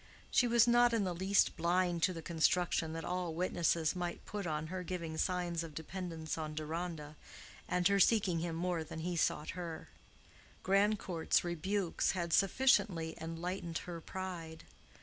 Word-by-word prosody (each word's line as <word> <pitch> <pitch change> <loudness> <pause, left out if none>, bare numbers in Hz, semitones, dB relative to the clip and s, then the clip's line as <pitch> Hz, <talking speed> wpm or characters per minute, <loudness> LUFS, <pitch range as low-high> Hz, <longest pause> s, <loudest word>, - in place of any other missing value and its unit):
She 245 - +4
was 235 0 +5
not 240 0 +5
in 225 -3 +2
the 185 -2 -1
least 190 +3 +2
blind 175 0 +1
to 185 - +3
the 165 -2 -7
construction 165 0 +1
that 165 0 -5
all 180 -2 -2
witnesses 170 -2 +1
might 175 -1 -4
put 205 -3 -4
on 155 -1 -2
her 185 +3 -4
giving 170 -3 -4
signs 175 -1 0
of 160 -3 -9
dependence 160 -2 -5
on 155 -1 -4
Deronda, 155 -1 -4 0.5
and 180 -1 +3
her 200 0 +3
seeking 195 -4 +4
him 165 0 -3
more 175 -1 -1
than 160 0 -7
he 175 +1 -2
sought 155 -2 0
her: 170 -3 -6 0.7
Grandcourt's 195 -3 +2
rebukes 175 +2 0
had 170 -3 -2
sufficiently 195 -6 +3
enlightened 165 +1 -4
her 170 -2 -6
pride. 170 -3 -6
175 Hz, 155 wpm, -34 LUFS, 165-185 Hz, 0.7 s, was